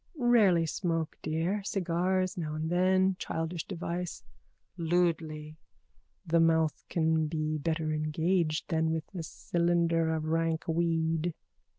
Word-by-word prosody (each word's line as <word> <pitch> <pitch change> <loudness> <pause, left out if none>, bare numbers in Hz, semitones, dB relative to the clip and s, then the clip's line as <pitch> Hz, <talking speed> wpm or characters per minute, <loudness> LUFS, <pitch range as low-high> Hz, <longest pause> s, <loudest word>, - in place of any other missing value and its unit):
_ - - -46
Rarely 215 - +4
smoke, 165 -1 -2
dear. 165 +6 -1
Cigar 185 -1 0
now 155 -3 -3
and 160 +1 -3
then. 185 +1 +3
Childish 165 +1 -3
device. 175 -1 -4 0.5
(Lewdly.) 160 -3 -1 0.7
The 165 +1 +2
mouth 160 -2 +2
can 160 -1 +1
be 155 -1 -2
better 155 +1 -1
engaged 155 +2 0
than 160 0 +2
with 160 -1 -2
a 180 - -4
cylinder 170 0 +1
of 160 -1 -1
rank 165 0 0
weed. 165 0 0
165 Hz, 120 wpm, -30 LUFS, 160-175 Hz, 0.7 s, Rarely